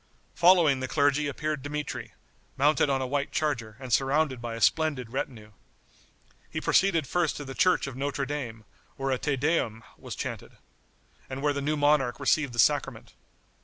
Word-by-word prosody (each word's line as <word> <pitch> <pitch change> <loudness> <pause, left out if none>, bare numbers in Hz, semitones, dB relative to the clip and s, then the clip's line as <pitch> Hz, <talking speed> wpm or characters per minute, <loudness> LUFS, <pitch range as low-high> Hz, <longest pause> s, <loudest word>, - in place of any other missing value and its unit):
Following 170 -6 +5
the 130 - -3
clergy 145 +1 +2
appeared 150 +1 -3
Dmitri, 150 +2 -5 0.4
mounted 145 +1 +3
on 135 -1 +1
a - - -1
white 140 +2 -2
charger, 120 -8 -2
and 130 -3 -5
surrounded 135 -1 +1
by 120 -1 -4
a - - -6
splendid 135 -4 +1
retinue. 110 -5 -5 1.0
He - - -3
proceeded 180 -6 +2
first 170 +3 0
to 145 - -6
the 135 - -7
church 185 +7 +3
of 135 -2 -6
Notre 140 +1 -2
Dame, 125 -6 -5 0.3
where 135 0 -2
a 130 - 0
Te 145 -2 0
Deum 130 -6 0 0.2
was - - -7
chanted, - - -6 0.8
and 135 +1 -5
where 145 -1 +2
the 140 - -3
new 150 +2 0
monarch 145 -4 +2
received 140 -1 +1
the - - -8
sacrament. 115 - +1
140 Hz, 170 wpm, -27 LUFS, 130-150 Hz, 1.0 s, Following